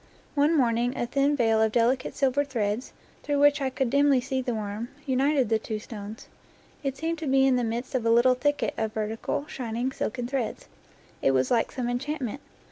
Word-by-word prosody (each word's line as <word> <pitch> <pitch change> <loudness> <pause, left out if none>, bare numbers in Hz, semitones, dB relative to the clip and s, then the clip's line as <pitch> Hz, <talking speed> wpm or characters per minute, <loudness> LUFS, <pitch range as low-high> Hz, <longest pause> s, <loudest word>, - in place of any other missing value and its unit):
One 300 +2 +3
morning 240 -1 +1
a - - 0
thin 280 +4 +1
veil 225 -4 +3
of 220 -1 +3
delicate 245 +3 +1
silver 275 +1 +2
threads, 230 -4 -2 0.3
through 290 -1 -1
which 290 +1 +4
I 270 - +1
could 260 -2 -1
dimly 280 -1 +4
see 260 +1 -2
the 250 - -2
worm^ 215 +1 -4 0.2
united 270 0 +2
the 220 -1 +2
two 220 0 -4
stones. 210 0 -9 0.5
It 275 -1 -3
seemed 325 +1 -2
to 315 - -4
be 270 0 +4
in 265 -1 +4
the 245 - +1
midst 235 +2 -3
of 255 -3 0
a 230 - +1
little 240 +2 +5
thicket 290 +4 0
of 220 -1 -1
vertical, 220 +6 -2
shining 245 -2 -3
silken 245 -1 -3
threads. 255 -3 -3 0.5
It 135 - +3
was 130 0 +1
like 235 -2 +2
some 250 -2 -3
enchantment. 270 +1 -3
250 Hz, 200 wpm, -27 LUFS, 230-275 Hz, 0.5 s, little